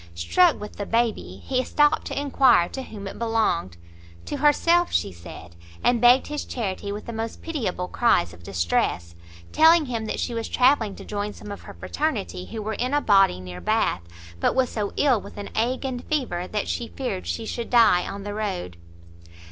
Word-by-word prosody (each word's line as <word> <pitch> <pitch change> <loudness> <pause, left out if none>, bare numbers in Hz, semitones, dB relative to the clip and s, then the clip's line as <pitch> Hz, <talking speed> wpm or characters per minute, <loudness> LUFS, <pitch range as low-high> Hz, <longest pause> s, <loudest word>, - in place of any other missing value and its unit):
Struck 85 - +3
with 210 - -9
the 205 - -4
baby, 225 - -1
he 255 -1 0
stopt 295 +3 +2
to - - -3
enquire 260 -10 +4
to 265 - -5
whom 205 -6 -8
it - - -8
belonged; 220 - 0 0.5
to 290 - -4
herself, 335 +5 +3
she - - 0
said, 85 0 -12 0.3
and 240 -2 +3
begged 245 +2 +6
his 295 0 -4
charity 200 -4 -4
with 205 +1 -6
the 235 - -6
most 225 0 -5
pitiable 220 - -3
cries 180 - +2
of 85 - -14
distress; 85 -1 -1 0.4
telling 320 0 +6
him 230 -4 -3
that - - -3
she 240 - -2
was 230 -1 -3
travelling 250 -5 +3
to - - -11
join 205 0 -3
some 210 - -10
of 200 - -7
her - - -11
fraternity, 230 -11 -3
who 220 -2 -6
were 220 +1 -3
in 250 +6 -1
a - - +4
body 195 - +4
near 90 0 -8
Bath, 85 - +1 0.4
but - - +1
was 260 -1 +2
so 210 -2 -2
ill 255 -7 +3
with - - -12
an 205 - -7
ague 250 +4 -1
and 250 -2 -4
fever 240 -13 -2
that - - -3
she 85 0 -3
feared 85 +1 -5
she 85 0 -3
should 235 -1 -4
die 230 -7 +5
on 200 0 -6
the 205 0 -5
road. 190 - -4
215 Hz, 195 wpm, -24 LUFS, 180-255 Hz, 0.5 s, begged